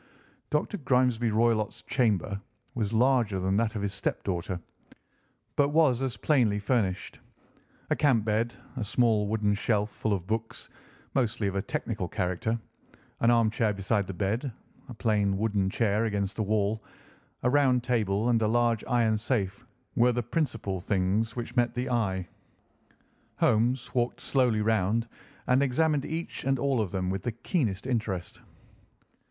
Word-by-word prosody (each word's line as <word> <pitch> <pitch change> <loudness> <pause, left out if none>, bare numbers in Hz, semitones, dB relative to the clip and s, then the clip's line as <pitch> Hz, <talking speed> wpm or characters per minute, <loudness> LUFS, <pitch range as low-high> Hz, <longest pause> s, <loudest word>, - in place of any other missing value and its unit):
Dr. 150 +7 0
Grimesby 125 -4 +2
Roylott's 110 -1 +1
chamber 105 -5 0 0.3
was 110 -4 -1
larger 115 -4 +2
than 95 +1 0
that 115 0 0
of 100 - -2
his 100 - -2
step - - -2
daughter, 90 -1 -2 1.0
but 145 -1 +3
was 145 -5 +3
as 130 -3 -2
plainly 120 -9 +2
furnished. 100 -3 -1 0.7
A - - +4
camp 125 -8 +3
bed, 115 +2 0 0.2
a 120 - -1
small 110 -1 +2
wooden 105 -1 +1
shelf 105 0 0
full 110 - -2
of 90 -3 -2
books, 110 +2 -4 0.4
mostly 120 -4 0
of 100 -1 -1
a 100 - +1
technical 110 - -3
character, 95 +4 -1 0.6
an 115 - +3
armchair 115 -2 +3
beside 100 0 0
the 95 - -5
bed, 110 +8 -1 0.4
a - - -6
plain 105 -3 +1
wooden 100 -2 +1
chair 105 +1 +1
against 100 -2 -1
the - - -2
wall, 105 +1 0 0.6
a 125 - +3
round 130 -3 +3
table, 110 -3 +1
and 115 -2 +3
a 110 - +3
large 120 -1 +2
iron 115 -3 +2
safe 105 -5 -1 0.3
were 125 +1 +4
the 120 0 -1
principal 115 - -2
things 100 +4 0
which 120 0 -5
met 120 -1 +2
the 125 +1 -2
eye. 95 -6 0 1.1
Holmes 120 +4 +1
walked 120 -1 0
slowly 125 -5 +1
round 110 +1 +1 0.4
and 125 +2 +3
examined 140 +2 +2
each 165 +2 -4
and 135 +1 +1
all 135 -2 +1
of 105 - -2
them 90 0 -2
with 95 0 -2
the 120 - -2
keenest 115 - -1
interest. 110 -9 -3
110 Hz, 155 wpm, -28 LUFS, 100-125 Hz, 1.1 s, A